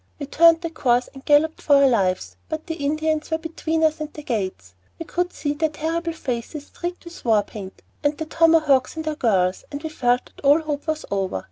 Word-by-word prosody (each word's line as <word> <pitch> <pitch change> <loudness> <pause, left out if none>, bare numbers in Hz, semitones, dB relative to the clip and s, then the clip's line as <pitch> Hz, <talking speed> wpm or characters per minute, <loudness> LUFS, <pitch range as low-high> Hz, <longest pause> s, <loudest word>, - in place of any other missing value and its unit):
We 285 - -5
turned 330 +3 +5
of 330 - -4
course 245 -4 +1
and 270 -1 -12
galloped 300 +2 +3
for 290 - +4
our 280 0 +6
lives, 190 -7 0
but 315 -1 -4
the 335 - -3
Indians 310 +1 0
were 320 - +1
between 320 0 -2
us 310 -1 +2
and 305 0 -5
the 300 - -10
gates. 190 - -3 0.2
We 330 - -6
could 355 +2 -1
see 290 -1 -2
their 315 +1 0
terrible 330 +2 -2
faces 275 0 -5
streaked 350 +3 -6
with 340 0 -11
war 220 -3 +3
paint, 195 -2 -10 0.2
and 290 0 +1
the 315 - -4
tomahawks 315 -4 +3
at 320 - -3
their 310 -1 -2
girdles, 190 -9 +1
and 285 +1 -6
we 315 - -3
felt 245 -4 +1
that - - -18
all 290 +3 +5
hope 295 -1 -4
was 310 0 -2
over. 195 - -1
300 Hz, 220 wpm, -23 LUFS, 250-320 Hz, 0.2 s, our